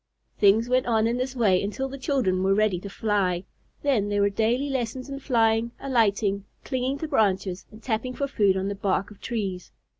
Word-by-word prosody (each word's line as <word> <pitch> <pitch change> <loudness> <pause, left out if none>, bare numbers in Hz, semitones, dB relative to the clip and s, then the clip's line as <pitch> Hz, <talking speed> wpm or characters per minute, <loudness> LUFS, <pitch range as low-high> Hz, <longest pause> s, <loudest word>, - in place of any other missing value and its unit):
Things 215 +3 +5
went 255 0 +1
on 220 -2 +2
in 235 +2 +1
this 255 +1 -3
way 200 -7 +3
until 210 +7 -3
the 275 +1 -8
children 255 - +1
were 195 +1 +3
ready 210 -4 +2
to 200 - -8
fly. 195 -4 0 0.4
Then 240 -8 +2
there 205 0 +1
were 200 0 +3
daily 230 +7 +1
lessons 255 0 -3
in 275 - -5
flying, 230 -3 +2
alighting, 205 -6 +1 0.2
clinging 260 +1 -1
to 315 - -4
branches, 190 -6 0
and 215 +1 -15
tapping 250 +2 -2
for 280 - -1
food 200 -8 +2
on 190 +1 -1
the 200 - -1
bark 200 0 -1
of 205 - -15
trees. 195 -7 -4
220 Hz, 200 wpm, -25 LUFS, 200-255 Hz, 0.4 s, Things